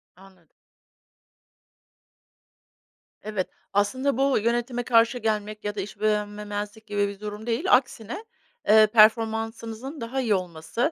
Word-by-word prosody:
Anladım. 185 -2 -19 2.8
Evet, 210 -3 -2 0.3
aslında 245 +7 +1
bu 275 0 +3
yönetime 240 +2 -1
karşı 235 0 +4
gelmek 215 -2 -2
ya 205 0 -3
da 200 - -2
iş 200 +1 -9
beğenmemezlik 210 0 -2
gibi 205 -1 0
bir 200 -1 -8
durum 210 +1 -7
değil, 235 +8 -1
aksine, 250 - +1 0.4
eee, 215 0 +7
performansınızın 225 +4 +2
daha 250 +4 -2
iyi 220 -5 +2
olması, 180 - -2
215 Hz, 115 wpm, -25 LUFS, 205-235 Hz, 2.8 s, eee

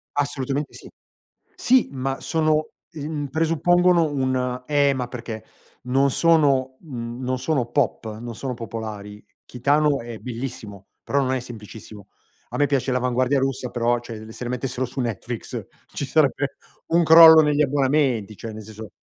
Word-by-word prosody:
Assolutamente 140 0 -2
sì. - - -12 0.7
Sì, 255 0 +3
ma 135 0 -3
sono, 155 -1 +1 0.2
ehm, 150 -1 -4
presuppongono 165 +2 +3
un 130 -2 -1
eh 145 -1 +3
ma 125 -2 -3
perché 115 -3 -7 0.4
non 135 +2 +2
sono, 140 -5 +3
mhmm, 120 -5 -7
non 130 0 -1
sono 130 -1 0
pop, 115 -5 -1
non 120 0 -7
sono 130 +2 -4
popolari. 110 -3 -7 0.2
Kitano 145 +3 +1
è 115 -1 -8
bellissimo, 115 -5 -7 0.2
però 140 - 0
non 130 -1 0
è 130 - -1
semplicissimo. 110 -3 -11 0.4
A - - -5
me 145 - +3
piace 135 -2 0
l'avanguardia 125 +2 +1
russa, 135 -2 -2
però 120 0 +1
cioè 110 -2 -9
se 120 +1 -6
mettessero 125 +1 -2
su 130 +2 -6
Netflix 120 0 -4 0.2
ci - - -5
sarebbe - - +1 0.3
un 170 +1 +3
crollo 160 0 +10
negli 150 0 +2
abbonamenti, 135 -6 +1
cioè 115 +2 -7
nel 110 0 -8
senso 110 0 -10
130 Hz, 150 wpm, -23 LUFS, 115-145 Hz, 0.7 s, crollo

